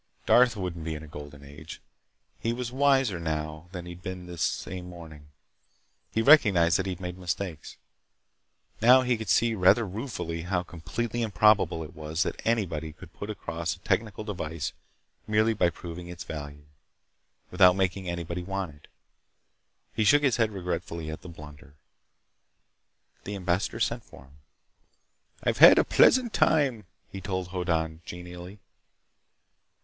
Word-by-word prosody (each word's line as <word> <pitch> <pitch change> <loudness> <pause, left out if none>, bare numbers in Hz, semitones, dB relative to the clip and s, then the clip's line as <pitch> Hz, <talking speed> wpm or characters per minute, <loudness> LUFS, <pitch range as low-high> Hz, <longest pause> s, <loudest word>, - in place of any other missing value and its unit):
Darth 120 -2 +5
wouldn't 90 -4 -4
be 80 0 -3
in 75 - -8
a - - -10
Golden 75 -1 -10
Age! 70 0 -10 0.6
He 115 - -1
was 120 0 -4
wiser 135 -7 +2
now 80 0 -4
than 90 -2 -7
he'd 90 0 -9
been 95 -1 -6
this 85 -2 -8
same 90 +3 -3
morning. 80 -4 -12 0.8
He 110 - 0
recognized 100 - +6
that 95 - -2
he'd 90 -2 -4
made 90 0 -6
mistakes. 90 -2 -5 1.0
Now 125 +3 +7
he 125 -1 +1
could 110 -3 -6
see 115 +5 +3
rather 105 +3 +4
ruefully 90 -6 -5
how 90 +1 -1
completely 110 +8 -4
improbable 105 -6 +3
it 75 - -11
was 80 +2 -2
that - - -5
anybody 85 -9 -1
could - - -14
put 100 - -7
across 85 -5 -4
a - - -20
technical 110 +1 -1
device 85 -7 -4 0.5
merely 110 +1 +3
by 95 -5 +2
proving 85 0 -8
its 85 -1 -8
value, 75 -2 -8 0.9
without 90 -1 +6
making 95 -1 -1
anybody 85 0 -4
want 95 -3 -4
it. 75 - -20 1.1
He 110 - +1
shook 145 +7 +5
his 135 -5 +3
head 115 -2 +2
regretfully 90 -4 -4
at 80 - -7
the 90 - -10
blunder. 75 -3 -13 1.5
The 105 - -5
ambassador 90 0 -1
sent - - -1
for 65 - -15
him. 70 +1 -21 1.1
"I've - - 0
had - - +10
a - - +6
pleasant 250 -3 +4
time," 135 -9 +2 0.3
he 95 - -7
told 95 -1 -3
Hoddan 80 -3 -2
genially. 90 +2 -9
90 Hz, 150 wpm, -27 LUFS, 80-105 Hz, 1.5 s, had